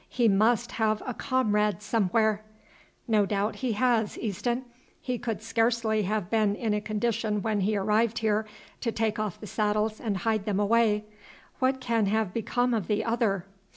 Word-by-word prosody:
"He 240 Hz, -3 st, +2 dB
must 225 Hz, +4 st, +3 dB
have 215 Hz, -1 st, 0 dB
a 250 Hz, -, -3 dB
comrade 210 Hz, -5 st, 0 dB
somewhere." 215 Hz, 0 st, +1 dB, 0.7 s
"No 215 Hz, -3 st, +3 dB
doubt 205 Hz, +2 st, -1 dB
he 255 Hz, -4 st, -1 dB
has, 230 Hz, -2 st, +1 dB
Easton; 240 Hz, +4 st, -2 dB, 0.3 s
he 250 Hz, -2 st, -3 dB
could 225 Hz, -2 st, -4 dB
scarcely 225 Hz, -1 st, +1 dB
have 210 Hz, -1 st, -1 dB
been 215 Hz, -3 st, +2 dB
in 220 Hz, -1 st, -1 dB
a 210 Hz, -, 0 dB
condition 215 Hz, -1 st, -1 dB
when 215 Hz, -2 st, 0 dB
he 205 Hz, +2 st, +1 dB
arrived 215 Hz, +3 st, +1 dB
here 215 Hz, 0 st, +1 dB, 0.3 s
to 235 Hz, -, -1 dB
take 220 Hz, -1 st, -1 dB
off 215 Hz, -4 st, -3 dB
the -, -, -8 dB
saddles 210 Hz, +1 st, 0 dB
and 210 Hz, -5 st, -1 dB
hide 215 Hz, +1 st, 0 dB
them 205 Hz, -2 st, 0 dB
away. 210 Hz, 0 st, +2 dB, 0.5 s
What 265 Hz, 0 st, +2 dB
can 230 Hz, -4 st, +1 dB
have 215 Hz, -2 st, 0 dB
become 245 Hz, +2 st, 0 dB
of 215 Hz, -6 st, -1 dB
the 210 Hz, 0 st, 0 dB
other?" 220 Hz, -6 st, 0 dB
220 Hz, 170 wpm, -27 LUFS, 210-230 Hz, 0.7 s, must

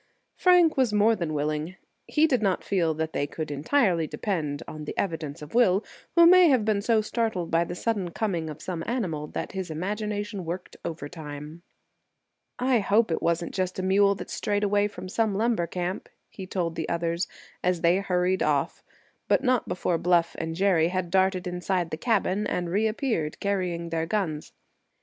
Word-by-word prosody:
Frank 355 Hz, -4 st, +5 dB
was 255 Hz, -4 st, +3 dB
more 210 Hz, +2 st, +4 dB
than 170 Hz, -6 st, -3 dB
willing. 150 Hz, +3 st, -2 dB, 0.3 s
He 305 Hz, +1 st, +3 dB
did 260 Hz, -7 st, +2 dB
not 195 Hz, -3 st, +1 dB
feel 170 Hz, -5 st, +1 dB
that 160 Hz, +1 st, -3 dB
they 145 Hz, -, -1 dB
could 155 Hz, -1 st, -5 dB
entirely 170 Hz, -, +1 dB
depend 155 Hz, -9 st, -3 dB
on 155 Hz, -1 st, -7 dB
the -, -, -6 dB
evidence 160 Hz, -6 st, -3 dB
of 150 Hz, -, -11 dB
Will, 210 Hz, -4 st, +4 dB, 0.3 s
who 340 Hz, -1 st, +8 dB
may 365 Hz, +1 st, +8 dB
have 255 Hz, -6 st, +3 dB
been 210 Hz, -2 st, +1 dB
so 225 Hz, +1 st, +3 dB
startled 215 Hz, -6 st, -2 dB
by 165 Hz, +1 st, +3 dB
the 175 Hz, -, -6 dB
sudden 200 Hz, -3 st, -1 dB
coming 170 Hz, -4 st, -2 dB
of 150 Hz, -, -9 dB
some 170 Hz, -3 st, -4 dB
animal 180 Hz, -12 st, -2 dB
that -, -, -5 dB
his 190 Hz, -2 st, -4 dB
imagination 205 Hz, +4 st, -3 dB
worked 175 Hz, +2 st, -6 dB
overtime. 150 Hz, 0 st, -7 dB, 1.0 s
"I 250 Hz, -1 st, +2 dB
hope 210 Hz, 0 st, +2 dB
it 160 Hz, -, -1 dB
wasn't 170 Hz, 0 st, 0 dB
just 185 Hz, -1 st, -2 dB
a 185 Hz, -, -2 dB
mule 200 Hz, +1 st, +4 dB
that -, -, -8 dB
strayed 205 Hz, 0 st, -1 dB
away 205 Hz, 0 st, +2 dB
from 200 Hz, -, -9 dB
some 215 Hz, +1 st, 0 dB
lumber 220 Hz, -5 st, +1 dB
camp," 180 Hz, +2 st, -4 dB, 0.2 s
he 190 Hz, -, -8 dB
told 175 Hz, -3 st, -2 dB
the 160 Hz, -1 st, -4 dB
others, 170 Hz, +1 st, -1 dB, 0.4 s
as 180 Hz, -2 st, +1 dB
they 170 Hz, +2 st, +4 dB
hurried 185 Hz, -1 st, 0 dB
off; -, -, 0 dB, 0.4 s
but -, -, +3 dB
not 255 Hz, -3 st, +2 dB
before 175 Hz, -2 st, -1 dB
Bluff 170 Hz, -1 st, +2 dB
and 160 Hz, 0 st, -3 dB
Jerry 180 Hz, -3 st, +3 dB
had 180 Hz, -1 st, -2 dB
darted 190 Hz, -1 st, +2 dB
inside 180 Hz, -1 st, -2 dB
the -, -, -1 dB
cabin 210 Hz, -1 st, 0 dB
and 175 Hz, -1 st, -2 dB
reappeared, 215 Hz, -, 0 dB
carrying 180 Hz, -4 st, -1 dB
their 165 Hz, 0 st, -1 dB
guns. 170 Hz, -7 st, -2 dB
185 Hz, 180 wpm, -26 LUFS, 165-210 Hz, 1.0 s, who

